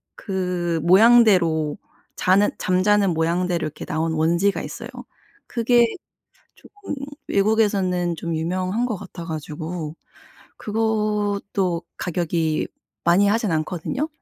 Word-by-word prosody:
그 180 -4 -2
모양대로 185 -6 +5 0.4
자는 195 +3 +3
잠자는 195 +1 +2
모양대로 170 +2 0
이렇게 150 - -7
나온 160 +1 -1
원지가 170 +5 +1
있어요. - - -7 0.6
그게 235 0 +3 0.7
쪼금 410 -5 -9 0.3
외국에서는 195 -5 +1
좀 170 +1 -4
유명한 185 +7 -1
것 220 - -2
같아 175 -2 -9
가지고 160 0 -5 0.6
그것도 210 -4 -1
가격이 165 -2 -1 0.4
많이 175 +4 +4
하지는 210 -4 +1
않거든요. 180 - -3
185 Hz, 250 characters per minute, -22 LUFS, 165-210 Hz, 0.7 s, 모양대로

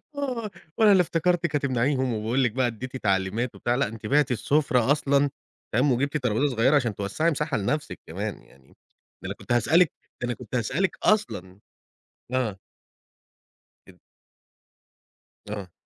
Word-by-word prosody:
آه، 250 -6 -3 0.3
وأنا 215 -2 +6
اللي 190 -2 +6
افتكرتِك 170 -1 0
هتمنعيهم 130 -2 +1
وباقول 115 +5 0
لِك 120 - +2
بقى 130 +1 +1
اديّتِ 125 +3 -5
تعليمات 105 +3 0
وبتاع 120 - 0
لأ، 135 -1 +1
أنتِ 110 0 -9
بِعتِ 145 +2 +3
السُفرة 135 0 +2
أصلًا 145 -1 +3 0.4
تمام، 130 +5 +3
وجبتِ 140 +5 +1
طرابيزة 125 +1 0
صغيّرة 125 +6 +4
عشان 120 -8 +1
توسّعي 130 +12 0
مساحة 150 -1 -1
لنفسِك 145 +9 -2
كمان - - -5
يعني، 65 0 -22 0.5
ده - - -11
أنا - - -3
كنت - - -9
هاسألِك 155 +8 +4 0.3
ده - - 0
أنا 120 - -1
كنت 125 0 -8
هاسألِك 145 - 0
أصلًا 100 - 0 0.7
آه. 120 -6 0 1.3
أب - - -15 1.5
آه. 100 -5 -6
130 Hz, 145 wpm, -26 LUFS, 115-150 Hz, 1.5 s, وأنا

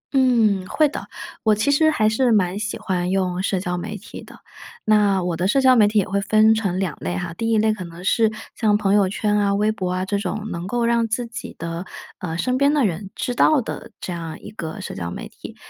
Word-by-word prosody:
嗯， 230 -7 +3
会 305 +10 +3
的。 - - -7 0.3
我 215 -2 +3
其 220 +7 +1
实 315 +2 +4
还 215 -8 +2
是 235 +3 +2
蛮 195 -2 +2
喜 215 +1 -3
欢 180 -2 -2
用 185 -1 0
社 190 -1 0
交 180 -1 -3
媒 205 +4 -5
体 - - -10
的。 - - -14 0.5
那 205 -3 +3
我 175 -1 -1
的 175 +3 0
社 270 +7 +3
交 260 -1 +6
媒 215 -4 +6
体 210 +1 0
也 200 - +2
会 200 +2 0
分 215 +2 +4
成 200 -5 -1
两 180 -6 -2
类 90 0 -3
哈， 165 - -4
第 225 +6 -2
一 225 - +3
类 215 0 +3
可 205 -4 -6
能 170 0 -10
是， 220 +2 +3 0.2
像 210 -2 +2
朋 200 -1 +1
友 200 -2 +4
圈 210 +1 0
啊、 200 -1 +2
微 210 +2 +2
博 185 -4 -3
啊 185 +1 -1
这 200 +1 -1
种， 215 +1 -4
能 170 +1 -5
够 235 +3 0
让 235 -1 +2
自 235 +2 -2
己 230 0 -8
的， 165 +2 -5 0.3
呃， 165 -2 -4
身 255 +7 0
边 280 +1 +4
的 285 -5 +3
人 190 +1 -3
知 250 - -2
道 300 +4 +4
的， - - -7
这 180 - -5
样 165 -2 -6
一 - - -10
个 170 -1 -6
社 - - -6
交 85 -2 -4
媒 - - -7
体。 - - -11
205 Hz, 265 characters per minute, -22 LUFS, 180-225 Hz, 0.5 s, 交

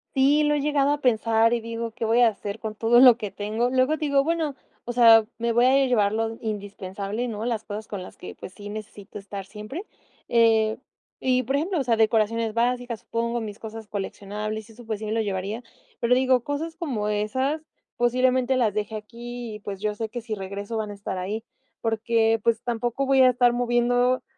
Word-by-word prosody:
Sí, 280 +3 +4
lo 295 0 +2
he 290 - 0
llegado 285 -1 +2
a 290 - 0
pensar 230 -2 +3
y 235 - 0
digo: 230 0 -4
"¿Qué 230 +1 -6
voy 225 +2 +3
a 235 - +7
hacer 205 0 -6
con 215 -1 -5
todo 230 +2 +4
lo 250 -2 +9
que 210 -4 -4
tengo?". 215 +5 -1
Luego 260 +4 +2
digo: 280 -3 +2
"Bueno, 320 -3 -1 0.3
o 240 - -3
sea, 230 -2 +7
me 235 0 0
voy 240 +2 +4
a 270 +1 +5
llevar 215 -5 +2
lo 225 0 -1
indispensable, 205 +1 -4
¿no? 220 -1 -4
Las 230 -3 -1
cosas 210 +1 -6
con 200 -3 -5
las 185 - -11
que, - - -9
pues, 185 - -10
sí 205 -1 -9
necesito 210 -1 -8
estar 195 -1 -7
siempre". 215 - -7 0.4
Eh, 225 -2 +3 0.4
y 255 -1 +2
por 270 +4 0
ejemplo, 340 +2 -1
o - - 0
sea, 235 -2 +2
decoraciones 225 0 +2
básicas, 245 -1 0
supongo, 235 +1 -2
mis 215 -2 -6
cosas 220 0 -8
coleccionables 210 +2 -5
y - - -13
eso, 240 - -13
pues 220 -2 -3
sí 215 0 -4
lo 225 - +1
llevaría. 200 +2 -3 0.4
Pero 240 +1 +3
digo: 255 -1 +3
"Cosas 315 +3 -3
como 265 - -2
esas 260 +9 -1 0.3
posiblemente 255 +1 +2
las 225 -5 +2
deje 210 +1 -3
aquí 235 +2 -7
y, - - -9
pues, 200 -2 -6
yo 210 0 -1
sé 220 +1 -4
que 240 +2 -5
si 225 -1 -5
regreso 200 +2 -5
van 215 -1 -2
a 205 - -6
estar 195 -2 -5
ahí 210 +5 -3 0.4
porque, 225 0 +2
pues, 230 -1 +1
tampoco 240 +3 -1
voy 270 0 +4
a 255 - +7
estar 245 -1 +3
moviendo". 245 +1 +2
230 Hz, 205 wpm, -25 LUFS, 215-250 Hz, 0.4 s, lo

